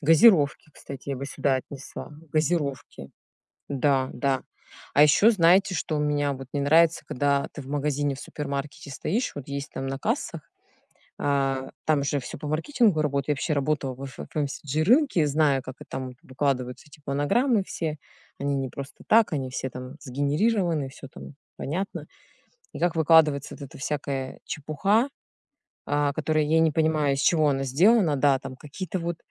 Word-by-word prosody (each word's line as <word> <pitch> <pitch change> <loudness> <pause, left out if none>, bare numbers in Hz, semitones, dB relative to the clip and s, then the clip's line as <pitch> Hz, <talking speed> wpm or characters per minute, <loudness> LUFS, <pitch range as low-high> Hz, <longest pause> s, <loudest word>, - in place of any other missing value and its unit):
Газировки, 160 -2 +5
кстати, 140 0 -8
я 135 - -2
бы 140 - -5
сюда 140 -1 0
отнесла, 135 +2 -8 0.2
газировки. 150 - -1 0.6
Да, 135 -1 +1
да. 135 -2 0 0.5
А 145 - +7
еще 155 +9 +6
знаете, 185 -1 +4
что 155 0 -2
у - - 0
меня 145 -1 +1
вот 135 -1 -9
не 145 - -1
нравится, 160 +3 +4
когда 140 +1 0
ты 150 - -8
в 130 - -14
магазине, 145 0 0
в 135 - -10
супермаркете 140 -1 -5
стоишь, 205 - -2
вот 145 -2 -8
есть 140 +1 -4
там 135 - -4
на 135 0 -3
кассах, - - -2 0.8
а, 135 -2 0 0.2
там 150 -3 +3
же 145 0 0
всё - - -8
по 150 - -6
маркетингу 185 - +2
работает. 140 -1 -1
Я 150 - +3
вообще 155 +3 -2
работала 140 -2 -1
в 135 +2 -8
эфе 130 - -8
в - - -15
FMCG 150 0 -2
рынке 250 - +4
и - - +2
знаю, 145 -2 +2
как, 130 +1 -9
э, - - -9
там 130 -1 -5
выкладываются 130 -3 -2
эти 150 +1 -17
планограммы 195 - +2
все. 155 -4 -4 0.4
Они 140 0 -1
не 135 -1 -2
просто 140 +2 -9
так, 225 -3 +5
они 130 -3 -2
все 130 - -3
там 125 +3 -8
сгенерированы, 150 - 0
всё 135 0 -11
там 140 - -11 0.2
понятно. 185 +7 -4 0.7
И - - -7
как 175 -1 +1
выкладывается 155 -3 +4
вот - - -15
эта 135 - -10
всякая 135 -2 -3
чепуха, 195 - 0 0.8
а, 145 -1 +1
которая 155 0 +1
я 160 +2 +3
не 160 -1 +4
понимаю, 155 -2 +2
из 135 - -3
чего 155 -2 +4
она 135 -1 0
сделана. 170 - +4
Да, 135 0 +4
там 130 0 -8
какие-то 185 +7 -5
вот, 170 0 -3
145 Hz, 175 wpm, -26 LUFS, 135-160 Hz, 0.8 s, А